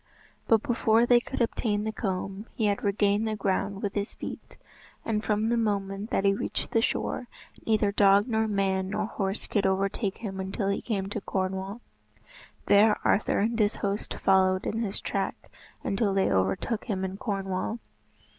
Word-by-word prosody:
But, 225 -2 +4
before 230 -1 +3
they 240 0 +6
could 250 +1 -5
obtain 210 -2 0
the 220 - -1
comb, 195 0 -4
he 220 - 0
had 205 -1 0
regained 205 +1 +2
the 215 - -1
ground 200 0 -1
with 200 -1 -1
his 205 +1 -3
feet, - - -8 0.5
and 215 -1 -1
from 215 +1 +1
the 235 - +2
moment 200 -1 -1
that 195 - 0
he 195 - +5
reached 195 - -3
the 225 - +3
shore, 245 - -1 0.4
neither 215 -2 +3
dog 200 +1 +5
nor 220 -2 +1
man 190 -2 0
nor 205 - -1
horse 195 -1 -3
could 205 -3 +1
overtake 195 +1 0
him 195 -4 -5
until 195 +1 -2
he 200 - -1
came 195 -5 -2
to 205 +1 -4
Cornwall. 190 +3 -3 0.8
There 210 +1 +5
Arthur 200 - +2
and 230 +2 0
his 210 -1 +2
host 200 +1 -3
followed 185 -1 +3
in 220 - -1
his 205 -3 -2
track - - -3 0.3
until 195 0 0
they 195 - +2
overtook 95 - 0
him 190 -5 -2
in 190 +1 -5
Cornwall. 195 0 -2
200 Hz, 175 wpm, -28 LUFS, 195-220 Hz, 0.8 s, they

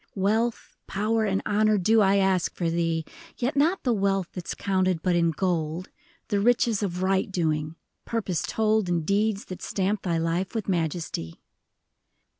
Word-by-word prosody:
Wealth, 220 +4 0
power, 220 +3 0
and 195 -1 0
honor 215 +1 +3
do 215 +4 +4
I 195 0 +4
ask 190 -3 +2
for 170 -2 -1
thee; 165 -1 0 0.3
Yet 255 +5 -1
not 320 +7 +2
the 245 - +2
wealth 195 -3 0
that 180 -2 -7
's - - -3
counted 185 -4 0
but 180 -2 +2
in 170 -1 +3
gold; 165 0 -2 0.4
The 205 -3 +1
riches 230 -1 +2
of 185 -2 -2
right 190 +1 +1
doing 155 -3 -1 0.2
— - - -53
purpose 200 -8 -1
told 215 -3 +1
In 170 -2 0
deeds 205 +3 0
that 185 - -8
stamp 195 +1 -1
thy 170 -3 0
life 165 +5 -1
with 220 - -2
majesty. 165 - -2
190 Hz, 170 wpm, -26 LUFS, 170-215 Hz, 0.4 s, do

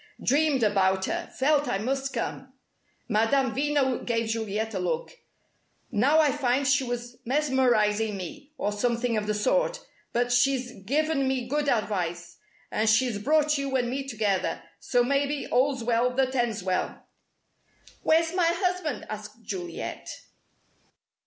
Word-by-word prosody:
Dreamed 285 -2 +2
about 190 -2 +2
her, 345 0 -3
felt 290 +2 +2
I - - 0
must 270 +5 -2
come!" 260 -1 -4 0.5
Madame 230 +3 +2
Veno 280 -1 +1
gave 230 -2 -1
Juliet 220 0 -2
a 190 - -2
look. 175 -3 -2 0.8
"Now 255 +7 +3
I 300 -3 +4
find 270 -1 +1
she 280 0 +3
was 245 -1 -5
mesmerizing 235 -6 +2
me 285 - -8
or 205 - -1
something 235 +2 0
of 210 -1 -1
the 210 - 0
sort. - - +1 0.3
But 245 +1 0
she's 250 0 +2
given 295 +2 +1
me 260 -2 -1
good 290 +2 0
advice, 175 -7 -2 0.3
and 215 0 +1
she's 225 -1 +2
brought 300 +5 +2
you 275 -1 -2
and 245 -2 +1
me 270 +1 -3
together, 210 -6 -1 0.2
so 245 -1 +2
maybe 280 +2 0
all's 260 0 +2
well 235 +1 +2
that 260 0 +1
ends 235 -6 0
well." 185 0 -2 1.0
"Where's 325 +1 +3
my 360 -2 +3
husband?" 360 -2 -1
asked 215 +1 -8
Juliet. 180 -5 -5
245 Hz, 140 wpm, -27 LUFS, 215-280 Hz, 1.0 s, I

